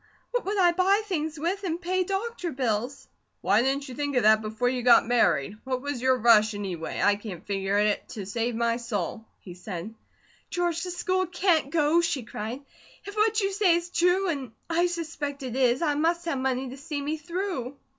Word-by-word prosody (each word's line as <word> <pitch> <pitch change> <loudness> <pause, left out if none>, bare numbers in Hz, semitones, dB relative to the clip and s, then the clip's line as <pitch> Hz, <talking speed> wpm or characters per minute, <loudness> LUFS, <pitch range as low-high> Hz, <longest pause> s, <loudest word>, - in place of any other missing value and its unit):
What - - -1
would 405 +2 -1
I 355 -2 +5
buy 385 +4 +2
things 320 -5 -2
with, 370 +6 -2
and 340 -2 -2
pay 370 +1 0
doctor 390 -1 -3
bills?" 250 0 -2 0.3
"Why 200 +4 +3
didn't 275 +3 0
you 255 - -8
think 285 +1 -3
of 245 - +3
that 215 0 +6
before 220 +3 -2
you 250 0 0
got 240 0 +6
married? 210 - +2
What 255 0 -3
was 285 -4 -3
your 260 0 +3
rush, 220 -2 +5
anyway? 185 -5 -4
I 205 - +4
can't 200 -5 -8
figure 195 0 -1
it 210 0 +1
to 205 -3 -5
save 230 +4 -2
my 230 0 +1
soul," 225 -2 -4 0.2
he 180 - -10
said. 180 +2 -7 0.6
"George, 345 -2 -1
the 365 - -4
school 370 +1 0
can't 350 -5 +1
go," 315 +2 +3
she 335 -7 -1
cried. 225 +5 -6 0.4
"If 405 +1 -8
what 430 0 +2
you 390 0 0
say 385 -3 +3
is 345 +1 -3
true, 360 +3 +2
and 270 -8 -4
I 345 +1 +2
suspect 315 -5 -4
it 255 -2 -4
is, 255 +2 +2
I 300 -3 +2
must 335 +3 0
have 280 -6 -1
money 260 0 -1
to 260 - -9
see 295 +1 -5
me 295 +3 -2
through." 315 -5 -4
280 Hz, 205 wpm, -27 LUFS, 230-345 Hz, 0.6 s, that